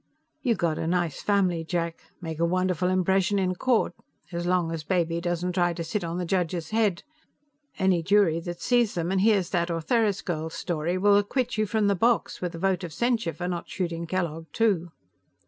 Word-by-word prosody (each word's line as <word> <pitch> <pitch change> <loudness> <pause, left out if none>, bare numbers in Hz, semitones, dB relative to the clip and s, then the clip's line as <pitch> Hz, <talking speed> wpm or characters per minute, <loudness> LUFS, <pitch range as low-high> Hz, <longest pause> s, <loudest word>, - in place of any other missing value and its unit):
"You 240 -4 +2
got 170 -4 -1
a 160 - -2
nice 175 -3 0
family, 185 -5 +1
Jack. 170 0 -2 0.2
Make 160 -2 -5
a - - +2
wonderful 185 0 +1
impression 190 +1 +2
in 185 -1 +1
court 240 +5 +1 0.4
as 175 0 -3
long 180 -2 +1
as 165 -1 -4
Baby 170 -1 0
doesn't 175 +1 -1
try 175 -1 +2
to 170 0 -4
sit 180 +4 -2
on 170 +1 -3
the 180 - -2
judge's 175 -2 -1
head. 215 -5 +1 0.7
Any 190 -3 +2
jury 185 -2 +3
that 175 +1 -7
sees 240 -4 +2
them 170 +1 -1
and 190 -1 +2
hears 200 -4 +3
that 170 -1 0
Ortheris 200 +5 +1
girl's 160 -2 -3
story 175 0 -2
will 200 +2 +5
acquit 245 +5 0
you 215 -1 0
from 220 0 +1
the 200 - +3
box, 230 +4 +1
with 175 -2 -3
a - - -5
vote 190 +1 0
of 170 - -5
censure 235 -3 0
for 175 +3 -4
not 175 -1 -4
shooting 170 -3 -3
Kellogg, 165 -2 -2
too." 200 -7 +1
180 Hz, 200 wpm, -26 LUFS, 170-200 Hz, 0.7 s, will